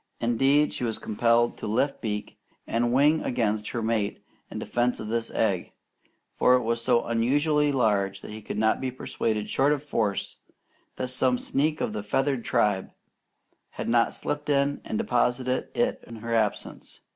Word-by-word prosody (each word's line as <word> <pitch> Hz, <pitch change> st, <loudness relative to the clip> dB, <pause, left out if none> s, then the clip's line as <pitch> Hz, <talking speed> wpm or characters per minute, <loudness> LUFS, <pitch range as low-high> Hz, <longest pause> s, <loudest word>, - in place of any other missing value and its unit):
Indeed, 135 Hz, +6 st, +3 dB
she -, -, -4 dB
was 115 Hz, -2 st, -1 dB
compelled 115 Hz, +2 st, +1 dB
to -, -, -4 dB
lift 130 Hz, +6 st, 0 dB
beak 105 Hz, -2 st, -4 dB, 0.3 s
and 120 Hz, +1 st, 0 dB
wing 145 Hz, +5 st, +4 dB
against 110 Hz, -3 st, -1 dB
her 120 Hz, -, -3 dB
mate 110 Hz, -2 st, -1 dB, 0.2 s
in -, -, -7 dB
defense 120 Hz, +1 st, 0 dB
of 110 Hz, -, -6 dB
this 115 Hz, 0 st, -1 dB
egg, -, -, -1 dB, 0.6 s
for 125 Hz, -, +5 dB
it 125 Hz, -, +1 dB
was 115 Hz, +1 st, -1 dB
so 120 Hz, -1 st, +3 dB
unusually 145 Hz, +6 st, +2 dB
large 100 Hz, -6 st, +1 dB
that -, -, -9 dB
he 110 Hz, +1 st, -8 dB
could 105 Hz, -, -6 dB
not 110 Hz, +1 st, +2 dB
be 130 Hz, -, -1 dB
persuaded 110 Hz, -4 st, -2 dB
short 140 Hz, +2 st, +2 dB
of 150 Hz, -1 st, 0 dB
force 110 Hz, -9 st, -2 dB, 0.6 s
that 130 Hz, -, -3 dB
some 125 Hz, 0 st, +2 dB
sneak 150 Hz, +5 st, 0 dB
of 105 Hz, -, -1 dB
the 105 Hz, -, -3 dB
feathered 135 Hz, +4 st, 0 dB
tribe 100 Hz, -3 st, +1 dB, 0.9 s
had -, -, -3 dB
not 115 Hz, 0 st, +2 dB
slipped 145 Hz, 0 st, -4 dB
in 140 Hz, 0 st, +1 dB
and 110 Hz, -, -3 dB
deposited 125 Hz, +2 st, 0 dB
it 245 Hz, +1 st, 0 dB
in 115 Hz, -, -9 dB
her 115 Hz, +1 st, -5 dB
absence. 110 Hz, -3 st, -2 dB
120 Hz, 170 wpm, -26 LUFS, 110-135 Hz, 0.9 s, for